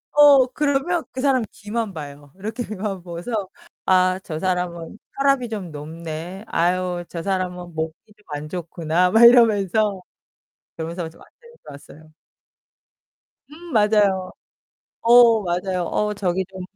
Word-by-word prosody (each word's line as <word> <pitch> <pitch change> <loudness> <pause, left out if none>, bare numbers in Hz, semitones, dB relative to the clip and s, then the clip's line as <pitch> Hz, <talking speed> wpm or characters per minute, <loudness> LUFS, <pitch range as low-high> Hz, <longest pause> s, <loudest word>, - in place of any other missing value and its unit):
어, 285 -3 +7
그러면 295 +5 0
그 255 - -5
사람 265 -3 +2
귀만 220 -1 -4
봐요. 145 -3 -9
이렇게 220 +5 -4
귀만 205 -3 -5
보고서 175 +6 -7 0.5
'아, 185 0 +3
저 155 -2 -5
사람은 180 0 -3 0.2
혈압이 275 -3 +2
좀 195 -7 -5
높네. 160 +5 -7
아유, 180 +1 0
저 170 -1 -6
사람은 180 -2 -3
목이 160 0 -3 0.2
좀 210 - -26
안 150 0 -6
좋구나.' 170 0 0
막 225 +3 +5
이러면서 215 -4 +4 0.7
그러면서 165 +1 -5
좀 160 - -20
맞추면서 475 0 -20 0.3
왔어요. 155 0 -18 1.4
음, 335 +3 -12
맞아요. 210 -4 +2 0.7
어 235 -2 +6
맞아요. 180 +1 -2
어, 210 +5 -1
저기 190 -2 -1
좀 190 -1 -9
190 Hz, 260 characters per minute, -22 LUFS, 170-225 Hz, 1.4 s, 어